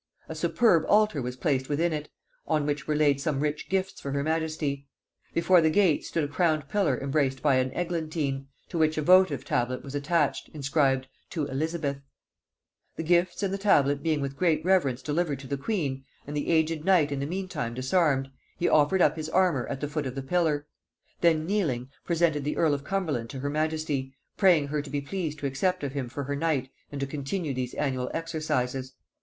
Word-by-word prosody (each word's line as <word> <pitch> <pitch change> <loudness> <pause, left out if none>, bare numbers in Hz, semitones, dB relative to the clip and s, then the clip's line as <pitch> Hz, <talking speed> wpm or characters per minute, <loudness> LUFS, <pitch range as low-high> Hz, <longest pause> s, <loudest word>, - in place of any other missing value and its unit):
A - - -5
superb 165 +2 +3
altar 210 -8 +4
was 125 0 -4
placed 130 0 0
within 160 +3 +1
it, 150 -1 -4 0.4
on 150 -2 +1
which 145 -2 -2
were 155 - +1
laid 145 -2 +3
some 145 -2 -1
rich 150 +1 -2
gifts 190 0 -1
for 140 - -4
her 140 0 0
majesty. 155 -3 -2 0.4
Before 170 +1 +4
the 160 - +4
gate 180 -3 +3
stood 165 - -1
a - - -1
crowned 155 -1 +1
pillar 170 -8 +1
embraced 135 -1 0
by 140 -3 +4
an 130 0 +1
eglantine, 155 -5 -2 0.2
to 170 - -3
which 155 0 +2
a 155 - 0
votive 180 -5 +5
tablet 125 +1 -1
was 140 - -8
attached, 145 +1 0
inscribed 135 -2 +1 0.2
"To 155 -4 -2
Elizabeth:" 145 0 -2 0.9
The 160 - -4
gifts 175 +4 +2
and 195 -1 0
the 195 - -2
tablet 145 -8 +3
being 155 -3 0
with 135 0 -3
great 160 -1 +1
reverence 145 -10 +2
delivered 150 -1 0
to - - -10
the 140 - -2
queen, 140 -5 -2 0.2
and 145 - -6
the 145 - -2
aged 160 -1 +2
knight 170 -5 +4
in 140 - -2
the 140 - -2
meantime 170 -9 -3
disarmed, 135 0 +1 0.3
he 175 - +1
offered 155 +5 +4
up 155 +2 +3
his 155 0 -4
armour 175 -8 +2
at 135 - -5
the 145 - -1
foot 145 -1 -3
of 130 - -6
the 135 - -4
pillar; 155 -1 +1 0.5
then 160 -2 +3
kneeling, 155 -11 -1 0.2
presented 165 -4 +1
the 150 - -2
earl 160 -3 +3
of 140 -1 -3
Cumberland 155 -11 -2
to 135 - -6
her 145 +1 -2
majesty, 155 -3 -1 0.2
praying 170 -8 +4
her 150 0 -1
to 145 - -10
be 145 +1 -1
pleased 155 +1 -4
to 145 - -6
accept 150 +6 0
of 140 -2 -3
him 135 -4 -3
for 140 +3 -4
her 145 +1 -3
knight 140 -4 -1 0.2
and 145 - -5
to - - +1
continue 145 +3 -3
these 125 -1 -4
annual 130 -3 -1
exercises. 140 -6 -2
150 Hz, 200 wpm, -27 LUFS, 140-165 Hz, 0.9 s, votive